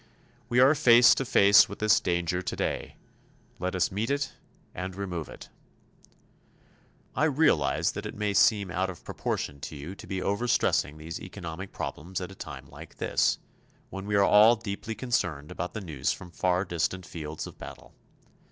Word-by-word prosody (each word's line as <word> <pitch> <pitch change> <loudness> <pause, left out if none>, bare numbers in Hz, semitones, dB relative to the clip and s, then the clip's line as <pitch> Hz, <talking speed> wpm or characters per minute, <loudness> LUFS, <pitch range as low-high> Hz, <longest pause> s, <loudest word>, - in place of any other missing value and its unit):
We 120 - +2
are 130 +4 +7
face 120 -5 +7
to 135 - -2
face 100 -1 +6
with 100 - -7
this 110 0 +4
danger 85 0 -1
today. 90 - -3 0.6
Let 90 +1 -2
us 90 -4 +1
meet 105 +4 -2
it 140 0 -1 0.4
and 90 +1 -5
remove 90 -5 -5
it. - - -11 1.7
I 155 - +2
realize 135 - +2
that - - -6
it - - -8
may 105 -1 -1
seem 100 -1 +3
out 95 +1 -1
of 90 - -9
proportion 70 -1 -3
to 75 - -7
you 75 +6 -7
to - - -12
be 95 - -3
over 100 +6 -1
stressing 75 -9 +1
these 80 +2 -7
economic 95 0 -7
problems 90 +5 -5
at 90 0 -6
a - - -9
time - - -9
like - - -12
this, - - +1 0.5
when 95 +1 -6
we 105 - 0
are 100 - +5
all 105 +4 +7
deeply 110 0 -5
concerned 90 - -2
about 90 - -5
the 110 - -3
news 75 -8 -2
from 90 - -8
far 90 +2 0
distant 85 +1 -2
fields 80 -2 -6
of - - -12
battle. - - -11
95 Hz, 175 wpm, -28 LUFS, 85-110 Hz, 1.7 s, are